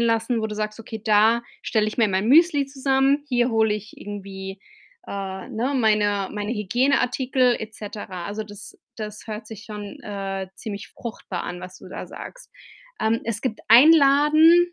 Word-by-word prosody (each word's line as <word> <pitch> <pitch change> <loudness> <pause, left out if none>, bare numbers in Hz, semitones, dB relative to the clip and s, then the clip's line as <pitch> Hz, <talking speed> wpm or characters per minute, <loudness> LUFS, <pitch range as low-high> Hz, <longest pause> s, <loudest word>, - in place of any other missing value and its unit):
lassen, 230 0 +1
wo 220 - -2
du 210 - -6
sagst: 215 +1 -3
„Okay, 220 0 -7
da 220 +2 +4 0.2
stelle 215 -2 +1
ich 215 - -5
mir 225 -2 +4
mein 190 +2 0
Müsli 290 +1 +5
zusammen. 270 +1 +2
Hier 245 -1 +2
hole 220 -2 +2
ich 210 0 -8
irgendwie, 195 -1 -7 0.5
äh, 190 +1 -5
ne, 250 +2 -2
meine 205 -4 +2
meine 210 +1 -3
Hygieneartikel 250 +3 +2
et 220 0 -7
cetera.“ 200 -4 -7
Also, 205 +2 -4
das 205 -1 -11 0.2
das 210 0 -7
hört 215 0 -6
sich 215 -1 -9
schon, 210 -2 -8
äh, 195 -2 -4
ziemlich 200 -2 -7
fruchtbar 210 -6 -6
an, 180 0 -6
was 185 0 -10
du - - -12
da - - -7
sagst. - - -10 0.5
Ähm, 220 +1 +1
es 225 -2 -2
gibt 240 -5 -2
einen 265 +8 +9
Laden, 310 +4 +5
220 Hz, 170 wpm, -23 LUFS, 205-250 Hz, 0.5 s, einen